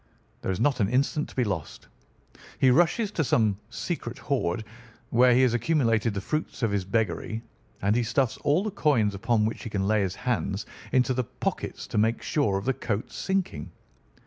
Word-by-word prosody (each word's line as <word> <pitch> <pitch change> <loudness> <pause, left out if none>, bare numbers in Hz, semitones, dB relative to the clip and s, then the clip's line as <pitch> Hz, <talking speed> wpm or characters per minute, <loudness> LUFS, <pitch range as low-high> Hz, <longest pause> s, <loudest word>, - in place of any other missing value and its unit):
There - - -3
is 95 0 -1
not 135 +3 +2
an 100 -2 +2
instant 140 +4 +1
to - - -14
be 125 - +2
lost. 95 -9 -4 0.7
He 130 - +5
rushes 175 - +3
to 165 - 0
some 110 -6 +2
secret 125 -2 -4
hoard, 120 -9 -1 0.5
where 125 +1 +5
he 130 - +5
has 125 -2 +3
accumulated 115 -4 +1
the 100 - -2
fruits 155 +1 -3
of 115 - +2
his 100 -2 0
beggary, 110 +2 -1 0.4
and 100 +2 +3
he 120 - +3
stuffs 120 +1 0
all 150 +6 +2
the 215 - -2
coins 120 - +2
upon 110 +2 +1
which 110 - -3
he - - -6
can 100 -2 -1
lay 110 0 +3
his 95 -1 -1
hands 105 -4 -2 0.3
into 130 0 +3
the 125 0 0
pockets - - -4
to - - -1
make 110 +2 +1
sure 105 -11 +1
of 100 - -5
the 135 - +2
coat's 110 -3 -3
sinking. 190 - -2
115 Hz, 195 wpm, -27 LUFS, 105-135 Hz, 0.7 s, He